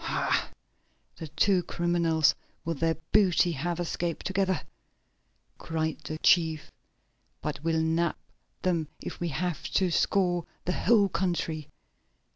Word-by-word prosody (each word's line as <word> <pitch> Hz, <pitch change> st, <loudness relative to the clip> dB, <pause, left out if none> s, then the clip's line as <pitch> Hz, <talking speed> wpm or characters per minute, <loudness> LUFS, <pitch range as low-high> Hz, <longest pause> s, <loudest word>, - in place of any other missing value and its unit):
"Ha! -, -, 0 dB, 0.7 s
The 160 Hz, -, -6 dB
two 180 Hz, +5 st, +2 dB
criminals 170 Hz, -3 st, +2 dB, 0.3 s
with 165 Hz, -3 st, -2 dB
their 165 Hz, 0 st, +2 dB, 0.2 s
booty 185 Hz, -4 st, +4 dB
have 170 Hz, +3 st, -2 dB
escaped 170 Hz, -1 st, -3 dB
together!" 190 Hz, -2 st, +1 dB, 1.0 s
cried 160 Hz, -1 st, -2 dB
the 155 Hz, +1 st, -6 dB
chief. 160 Hz, -2 st, +3 dB, 0.7 s
"But 150 Hz, -1 st, -4 dB
we'll 160 Hz, -1 st, +1 dB
nab 165 Hz, +1 st, +1 dB, 0.5 s
them 170 Hz, -4 st, +1 dB
if -, -, -7 dB
we 175 Hz, -, -1 dB
have 170 Hz, +1 st, -2 dB
to 185 Hz, -2 st, +2 dB
scour 175 Hz, 0 st, +2 dB, 0.2 s
the 180 Hz, -, 0 dB
whole 210 Hz, 0 st, +4 dB
country. 170 Hz, -5 st, -2 dB
170 Hz, 120 wpm, -28 LUFS, 160-180 Hz, 1.0 s, booty